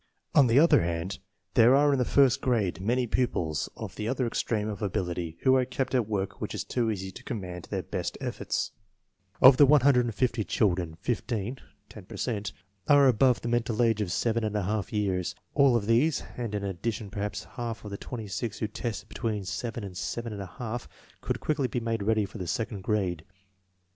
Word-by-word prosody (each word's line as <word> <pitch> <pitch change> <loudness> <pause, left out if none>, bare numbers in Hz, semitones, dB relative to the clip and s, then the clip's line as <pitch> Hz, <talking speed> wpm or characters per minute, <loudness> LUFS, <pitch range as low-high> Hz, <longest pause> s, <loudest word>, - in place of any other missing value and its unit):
On 140 -3 +6
the 115 +2 +3
other 165 +4 +6
hand, 85 +3 -3 0.3
there 120 +2 +6
are 145 +1 +4
in 135 - +1
the 125 - +2
first 135 0 +4
grade 100 -9 0
many 120 +5 +1
pupils 90 -11 -1
of - - -7
the 105 - -3
other 130 +1 0
extreme 110 -2 -1
of 105 -3 -5
ability 90 -5 -2
who 130 -1 +5
are 130 - +4
kept 130 +2 -3
at 125 -5 +2
work 100 -2 -2
which - - -3
is - - -2
too 120 -3 -1
easy 95 -3 -3
to - - -12
command 90 -7 -5
their - - -2
best - - -4
efforts. - - -2 0.7
Of 130 0 +10
the 145 - +7
150 125 -5 +3
children, 90 -6 0
15 120 +2 -2 0.3
(10 - - -12
per - - -9
cent) 105 -4 -2 0.4
are 145 -1 +6
above 125 +1 +4
the - - -4
mental 120 -1 +1
age 115 -2 +2
of 95 -4 -2
7 115 +4 0 0.5
years. 100 -5 -1 0.2
All 140 -4 +5
of 110 -4 +1
these, 125 +8 +2
and 115 -4 -4
in 100 - -2
addition 100 +2 -3
perhaps 105 -1 -3
half 115 -2 -6
of 105 - -7
the 100 - -4
26 110 -2 -5
who 110 - -1
tested 115 +1 -5
between 105 -5 -3
7 115 +3 -4
and 95 -2 -7
7J, 110 +3 -5 0.3
could - - -2
quickly 145 -4 0
be 125 - -2
made 115 -2 -2
ready 110 0 +2
for 105 - -9
the 90 - -4
second 105 +1 -2
grade. 95 -5 -1
115 Hz, 185 wpm, -28 LUFS, 100-125 Hz, 0.7 s, Of